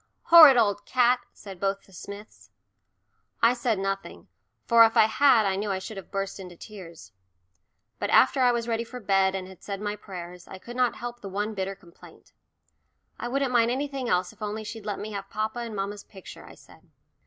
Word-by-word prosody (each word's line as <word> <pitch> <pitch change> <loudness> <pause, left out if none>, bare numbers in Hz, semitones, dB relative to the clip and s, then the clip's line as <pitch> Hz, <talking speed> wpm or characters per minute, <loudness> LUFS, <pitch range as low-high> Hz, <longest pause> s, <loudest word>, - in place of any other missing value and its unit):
"Horrid 315 -6 +9
old 205 -3 +2
cat," 250 0 +3
said 195 -3 -12
both 195 +1 -1
the 195 - -22
Smiths. 200 +4 -11 0.9
I 230 +1 +6
said 240 -3 -1
nothing, 195 0 -5 0.4
for 230 -1 +7
if 225 0 +3
I - - +7
had 230 0 +4
I 195 -1 +1
knew 205 +2 -3
I 190 - -1
should 190 +3 -8
have 195 - -9
burst 195 0 -4
into 180 -2 -10
tears. 170 - -12 0.9
But - - -2
after 265 - +4
I 250 -1 +5
was 235 -1 -2
ready 230 0 -1
for 250 +2 -9
bed 195 -3 +2
and 185 -1 -5
had 190 -2 -14
said 200 -1 -6
my 210 0 -3
prayers, 180 -3 -10
I - - -9
could 235 +6 -11
not 250 -2 +1
help 240 0 -7
the 195 - -7
one 205 +3 -3
bitter 195 -1 -4
complaint. 175 -2 -18 0.9
"I 240 - -4
wouldn't 270 0 -1
mind 230 -1 +4
anything 270 -1 -3
else 180 0 0
if - - -27
only 210 +1 -4
she'd 215 0 -8
let 205 - -2
me 215 - -6
have 195 -1 -6
papa 215 +3 -3
and 230 -2 -6
mamma's 200 +1 -4
picture," 190 - -13
I - - -13
said. - - -19
210 Hz, 205 wpm, -26 LUFS, 195-235 Hz, 0.9 s, Horrid